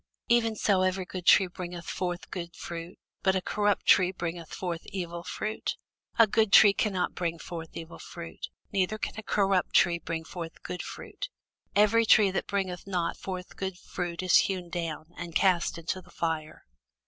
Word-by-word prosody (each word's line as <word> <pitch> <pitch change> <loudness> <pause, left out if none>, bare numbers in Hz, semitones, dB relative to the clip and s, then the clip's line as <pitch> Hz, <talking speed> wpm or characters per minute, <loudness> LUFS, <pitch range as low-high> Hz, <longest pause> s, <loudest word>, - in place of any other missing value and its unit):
Even 230 -2 +3
so 200 -2 +2
every 185 0 +1
good 180 -1 -7
tree 195 - +8
bringeth 175 -1 -7
forth 180 -1 -3
good 170 -2 -5
fruit; 170 +1 -7 0.2
but 190 -1 +3
a - - +3
corrupt 205 0 +1
tree 185 -2 +6
bringeth 170 -3 -5
forth 175 -3 -3
evil 175 -3 -4
fruit. 215 +4 -3 0.4
A 230 - +8
good 220 0 +2
tree 205 -1 +9
cannot 195 -3 0
bring 170 -1 -2
forth 165 -1 -7
evil 165 0 -8
fruit, 170 -1 -8 0.2
neither 200 +2 +1
can - - -3
a - - -4
corrupt 195 -3 +1
tree 175 -2 +5
bring 165 -1 -4
forth 165 -1 -7
good 180 - -4
fruit. - - -7 0.5
Every 220 +2 +5
tree 205 -3 +6
that 190 - -2
bringeth 190 -3 -2
not 180 -3 -1
forth 185 -1 -6
good 190 -2 -4
fruit 175 -1 -4
is 185 - +6
hewn 185 -3 0
down, 165 -2 -4
and 170 -1 -6
cast 185 -4 +3
into 170 +3 -3
the 180 - -20
fire. 160 -2 -3
180 Hz, 175 wpm, -29 LUFS, 170-195 Hz, 0.5 s, tree